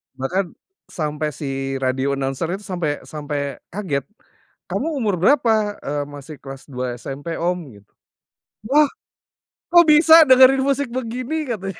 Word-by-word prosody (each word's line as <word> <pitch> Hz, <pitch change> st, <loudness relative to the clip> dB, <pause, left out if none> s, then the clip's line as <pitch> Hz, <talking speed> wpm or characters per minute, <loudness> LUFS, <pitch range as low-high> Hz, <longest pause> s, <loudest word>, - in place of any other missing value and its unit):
bahkan, 170 Hz, +7 st, -2 dB, 0.4 s
sampai 150 Hz, -1 st, -3 dB
si 135 Hz, -1 st, -4 dB
radio 135 Hz, +1 st, -1 dB
announcer-nya 150 Hz, +8 st, -2 dB
tuh 210 Hz, -, -13 dB
sampai 175 Hz, -5 st, -1 dB, 0.2 s
sampai 150 Hz, -1 st, -4 dB, 0.3 s
kaget, 170 Hz, -9 st, -2 dB, 0.7 s
"Kamu 305 Hz, -, -1 dB
umur 205 Hz, -7 st, 0 dB
berapa?" 220 Hz, -, +3 dB
Eee, 145 Hz, 0 st, -2 dB
"Masih 145 Hz, +1 st, -10 dB
kelas 135 Hz, -1 st, -10 dB
2 125 Hz, -1 st, -3 dB
SMP, 140 Hz, +7 st, -6 dB
Om." 180 Hz, +2 st, -1 dB, 0.2 s
Gitu, 100 Hz, 0 st, -20 dB, 0.8 s
"Wah, 295 Hz, +2 st, +5 dB, 0.8 s
kok 345 Hz, 0 st, +8 dB
bisa 320 Hz, +1 st, +8 dB
dengerin 260 Hz, +1 st, +7 dB
musik 280 Hz, -2 st, 0 dB
begini?" 255 Hz, +5 st, -3 dB
Katanya. 195 Hz, -6 st, -5 dB
175 Hz, 130 wpm, -21 LUFS, -, 0.8 s, kok